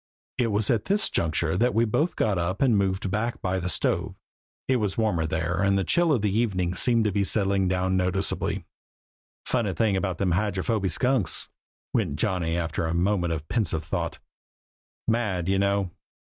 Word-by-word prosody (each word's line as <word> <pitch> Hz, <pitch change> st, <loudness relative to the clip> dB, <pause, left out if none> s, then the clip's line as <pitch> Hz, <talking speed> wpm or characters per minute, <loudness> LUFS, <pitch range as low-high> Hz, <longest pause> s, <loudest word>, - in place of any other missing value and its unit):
It 120 Hz, -, +3 dB
was 105 Hz, -1 st, +1 dB
at 115 Hz, -4 st, 0 dB
this 205 Hz, +2 st, +1 dB
juncture 80 Hz, 0 st, 0 dB
that 120 Hz, +5 st, +1 dB
we 115 Hz, +1 st, +4 dB
both 150 Hz, +10 st, 0 dB
got 105 Hz, -5 st, +1 dB
up 90 Hz, +7 st, -1 dB
and 125 Hz, -5 st, +4 dB
moved 95 Hz, -1 st, 0 dB
back 110 Hz, +4 st, -1 dB
by 95 Hz, 0 st, -1 dB
the 90 Hz, +1 st, -3 dB
stove. -, -, 0 dB, 0.5 s
It 130 Hz, -, +3 dB
was 105 Hz, -4 st, -2 dB
warmer 90 Hz, -8 st, +1 dB
there 80 Hz, +2 st, -1 dB
and 100 Hz, 0 st, +3 dB
the 95 Hz, -, +1 dB
chill 170 Hz, -, +2 dB
of 115 Hz, -7 st, +1 dB
evening 95 Hz, -4 st, 0 dB
seemed 115 Hz, +4 st, +3 dB
to 105 Hz, -, +2 dB
be 100 Hz, +1 st, +1 dB
settling 100 Hz, -1 st, +2 dB
down 95 Hz, +1 st, +1 dB
noticeably. 95 Hz, +1 st, -1 dB, 0.8 s
"Funny 115 Hz, -7 st, 0 dB
thing 100 Hz, +4 st, +1 dB
about 95 Hz, -2 st, -1 dB
Hydrophoby 100 Hz, +2 st, 0 dB
Skunks," 125 Hz, -7 st, +1 dB, 0.4 s
went -, -, 0 dB
on -, -, -4 dB
Johnny 85 Hz, 0 st, 0 dB
after 80 Hz, -1 st, -2 dB
a 80 Hz, -, -1 dB
moment 90 Hz, -1 st, +1 dB
of 80 Hz, -1 st, -4 dB
pensive 85 Hz, -9 st, 0 dB
thought -, -, -3 dB, 0.9 s
"mad, 105 Hz, -7 st, 0 dB
you 95 Hz, 0 st, +2 dB
know!" 100 Hz, -2 st, +1 dB
95 Hz, 175 wpm, -26 LUFS, 90-110 Hz, 0.9 s, we